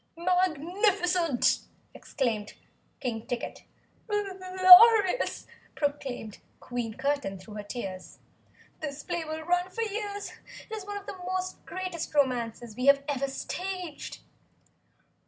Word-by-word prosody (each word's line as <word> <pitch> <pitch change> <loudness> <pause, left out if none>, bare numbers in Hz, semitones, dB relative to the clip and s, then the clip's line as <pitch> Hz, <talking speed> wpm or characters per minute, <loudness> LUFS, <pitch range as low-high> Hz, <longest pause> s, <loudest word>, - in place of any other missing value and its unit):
"Magnificent!" 355 - +2 0.3
exclaimed 220 -6 -2 0.5
King 230 -3 -4
Ticket. 245 - -5 0.4
"Glorious!" 385 +2 +6 0.3
proclaimed 275 -7 -3 0.2
Queen 240 -3 -4
Curtain 280 -9 -1
through 190 +3 -12
her 210 - -5
tears. 195 -4 -7 0.6
"This 290 -2 -5
play 345 -2 -2
will 315 0 -5
run 355 +2 +1
for 460 +5 -2
years 410 -1 -4 0.4
it - - -2
is 410 -2 -7
one 410 0 -4
of 405 - -9
the 375 -2 -8 0.5
greatest 370 -4 -5
romances 240 -5 0
we 250 +3 -2
have 280 0 +6
ever 275 -1 -1
staged!" 360 +3 -5
315 Hz, 110 wpm, -28 LUFS, 250-370 Hz, 0.6 s, Glorious